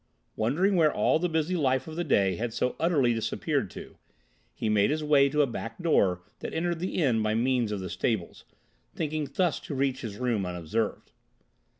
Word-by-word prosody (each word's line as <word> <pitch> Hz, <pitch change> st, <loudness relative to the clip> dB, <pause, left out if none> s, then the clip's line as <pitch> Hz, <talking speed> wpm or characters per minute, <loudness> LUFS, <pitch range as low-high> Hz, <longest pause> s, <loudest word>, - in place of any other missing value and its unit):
Wondering 170 Hz, -, +1 dB
where 155 Hz, -3 st, +5 dB
all -, -, +2 dB
the 180 Hz, +1 st, 0 dB
busy 160 Hz, +2 st, 0 dB
life 130 Hz, -4 st, +1 dB
of 160 Hz, -, -7 dB
the 175 Hz, -, -1 dB
day 100 Hz, -, +2 dB
had 115 Hz, +2 st, -4 dB
so 125 Hz, +1 st, 0 dB
utterly 150 Hz, -8 st, +3 dB
disappeared 115 Hz, -1 st, -1 dB
to, -, -, -11 dB, 0.5 s
he -, -, -4 dB
made 105 Hz, -1 st, +3 dB
his 155 Hz, +1 st, -1 dB
way 145 Hz, -2 st, +4 dB
to 150 Hz, +1 st, +3 dB
a -, -, +3 dB
back 115 Hz, -2 st, -6 dB
door 95 Hz, -, +2 dB, 0.2 s
that -, -, -6 dB
entered 170 Hz, 0 st, -1 dB
the 185 Hz, +2 st, -3 dB
inn 130 Hz, -10 st, +2 dB
by 110 Hz, 0 st, 0 dB
means 120 Hz, -1 st, +1 dB
of 100 Hz, -2 st, -3 dB
the 95 Hz, -, -4 dB
stables, 95 Hz, 0 st, -2 dB, 0.5 s
thinking 155 Hz, -2 st, -2 dB
thus 175 Hz, +1 st, +1 dB
to 145 Hz, -, -6 dB
reach 135 Hz, -1 st, 0 dB
his 105 Hz, -4 st, -6 dB
room 120 Hz, -5 st, 0 dB
unobserved. 90 Hz, +5 st, -3 dB
130 Hz, 195 wpm, -28 LUFS, 110-155 Hz, 0.5 s, where